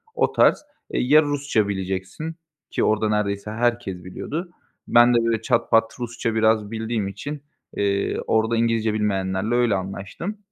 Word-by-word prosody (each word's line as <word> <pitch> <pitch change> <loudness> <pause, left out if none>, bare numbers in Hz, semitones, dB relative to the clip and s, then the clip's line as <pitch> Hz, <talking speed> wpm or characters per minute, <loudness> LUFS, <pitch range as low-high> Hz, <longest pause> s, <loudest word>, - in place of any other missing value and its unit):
o - - +2
tarz. - - +3 0.3
E, - - 0
ya, 150 +5 +5
Rusça 145 -7 0
bileceksin, 95 - -4 0.4
ki - - 0
orada 110 0 +2
neredeyse 105 0 -1
herkes 115 -5 -1
biliyordu. 160 - -5 0.4
Ben 120 +1 +6
de, 115 -1 +3
böyle, 115 -1 +1
çat 115 +1 0
pat 115 0 +4
Rusça 120 -1 -3
biraz 110 -1 +2
bildiğim 110 -2 -2
için, 145 +8 -6 0.3
eee, 100 -1 0
orada 110 +1 +2
İngilizce 115 -1 +1
bilmeyenlerle 100 +1 0
öyle 120 -4 +3
anlaştım, 100 - -5
110 Hz, 150 wpm, -23 LUFS, 100-120 Hz, 0.4 s, Ben